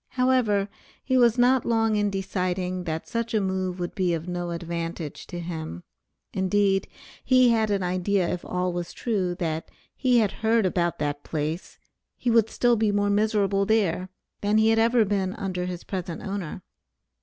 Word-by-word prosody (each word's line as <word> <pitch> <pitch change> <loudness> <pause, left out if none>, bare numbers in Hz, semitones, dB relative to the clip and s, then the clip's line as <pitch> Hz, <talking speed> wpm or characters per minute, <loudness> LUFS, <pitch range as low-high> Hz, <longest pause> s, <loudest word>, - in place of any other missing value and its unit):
However, 250 -6 +2 0.4
he 260 - 0
was 240 -2 +5
not 250 +1 +4
long 225 -2 +2
in 205 -1 +2
deciding 185 -2 -2
that 160 -1 -3
such 230 -1 -2
a - - +4
move 190 -2 -2
would 175 -1 -3
be 180 -4 +1
of 165 +1 -6
no 175 -1 -3
advantage 170 -2 -5
to 175 - -6
him; 160 - -6 0.5
indeed, 195 0 +2 0.4
he 255 -1 +5
had 220 -2 +2
an 200 -2 0
idea 180 +1 +1
if 180 - -3
all 180 0 -1
was 175 -1 -4
true 190 -7 -1
that 165 -2 -3 0.3
he 255 -2 +3
had 215 -4 +3
heard 225 -1 +1
about 175 -2 0
that 145 -1 -2
place, 155 +2 -4 0.4
he 240 - 0
would 225 -2 +4
be - - -16
still 240 -2 +2
more 205 0 +1
miserable 205 -2 +2
there, 190 -4 +1 0.3
than 205 +1 +2
he 220 0 +4
had 225 0 +3
ever 230 0 +4
been 195 -1 -1
under 185 -4 -3
his 180 -1 -5
present 180 -3 -5
owner. 195 -5 -5
195 Hz, 175 wpm, -25 LUFS, 175-220 Hz, 0.5 s, was